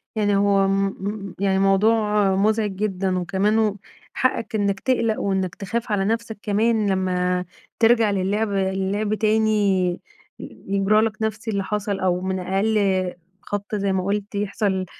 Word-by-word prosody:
يعني 205 -2 +1
هو 195 -1 +3
م 195 0 +1
م 200 -1 -5
يعني 195 -1 +1
موضوع 210 0 +3
مُزعِج 215 +1 +1
جدًا، 190 -2 -1
وكمان 195 +5 +1
و 210 -2 +1 0.4
حقّك 230 -3 -1
إنّك 200 -2 0
تقلق 230 -3 0
وإنّك 190 -2 -1
تخاف 230 +4 -4
على 195 -2 +1
نفسك 225 0 -2
كمان 215 0 +1
لما 180 -1 0 0.3
ترجع 225 -2 +4
للعب 200 +3 0
اللعب 195 +2 -1
تاني 220 0 +2 0.9
ي - - -7 0.2
يجرى 200 +2 +3
لك 220 -1 -2
نفس 220 +1 -3
اللي 200 -3 -1
حصل 205 0 -2
أو 180 -1 0
من 190 0 -2
أقل 195 -1 0 0.3
خبطة 205 +1 -4
زي 200 -1 0
ما 185 - 0
قُلت 205 +1 -3
يحصل 200 -2 -1
200 Hz, 150 wpm, -22 LUFS, 195-215 Hz, 0.9 s, ترجع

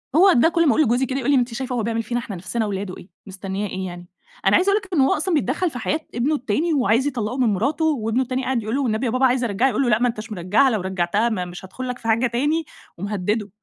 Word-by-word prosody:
هو 375 +3 +7
ده 285 +5 +4
كل 335 -1 +2
ما - - +5
أقول 315 - +3
لجوزي 245 0 +2
كده 265 +1 -2
يقول 275 +2 0
لي - - +5
أنتِ 245 -1 0
شايفه 255 +1 -3
هو 235 - -1
بيعمل 230 +1 -1
فينا 240 +3 -2
إحنا 215 -5 -6
نفسنا 220 +6 -3
ولاده 195 -2 -4
إيه، - - -13 0.2
مستنيه 195 +1 -4
إيه 190 0 -4
يعني؟ 175 0 -9 0.4
أنا - - +5
عايزة 370 +2 +3
أقول 415 +1 +2
لِك 375 - -11
إنه 275 -5 +4
هو - - +3
أصلًا 335 +4 -1
بيتدخل 305 +4 +1
في 250 -5 -7
حياة 310 - -1 0.2
ابنه 275 +6 +1
التاني 290 +6 0
وعايز 250 0 +2
يطلقه 245 -2 -2
من 255 - +2
مراته 280 - 0
وابنه 245 -5 +1
التاني 255 +1 -2
قاعد 255 -4 -1
يقول 220 +4 -2
له: 280 - 0
"والنبي 225 0 0
يا 235 - 0
بابا 255 +2 +2
عايز 255 -1 +2
أرجعها" 230 +4 +1
يقول 250 +2 0
له: 245 - +1
"لأ 215 -1 +3
ما 245 +1 +2
نتش 225 0 -7
مرجعها، 205 +9 +2
لو 215 -6 -1
رجعتها 190 +4 0
ما 185 -5 -2
مش 175 +1 -9
هادخل 255 +7 -7
لك 250 - -4
في 230 - -8
حاجة 230 +3 +3
تاني،" 290 +7 0 0.3
ومهدده. 205 +2 -2
240 Hz, 275 wpm, -22 LUFS, 210-270 Hz, 0.4 s, هو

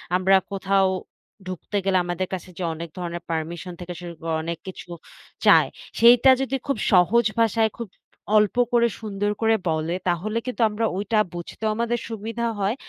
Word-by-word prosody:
আমরা 190 +1 +4 0.2
কোথাও 195 0 +2 0.6
ঢুকতে 185 +3 -4
গেলে, 190 -1 +3
আমাদের 175 +1 -2
কাছে 185 0 -5
যে 185 - -4
অনেক 165 +1 -7
ধরণের 175 -1 -5
পারমিশন 165 +2 -4
থেকে 175 0 -6
শুরু 175 -1 -7
করে, 165 -1 -2
অনেক 170 0 -3
কিছু 180 -1 -9 0.6
চায়। - - +7 0.3
সেইটা 240 +3 +7
যদি, 270 0 -1
খুব 275 - 0
সহজ 200 +6 +4
ভাষায়, 225 -1 +3
খুব 235 -2 -5 0.5
অল্প 210 0 +3 0.2
করে, 235 0 +5
সুন্দর 205 -1 -2
করে 225 0 +4
বলে, 160 +2 -1
তাহলে 210 +6 -1
কিন্তু 250 -1 -4
আমরা 220 +2 -1
ওইটা 210 +2 +1
বুঝতেও 175 +5 -4
আমাদের 235 +1 -1
সুবিধা 225 +2 -4
হয়। 200 +5 0
195 Hz, 165 wpm, -24 LUFS, 175-225 Hz, 0.6 s, চায়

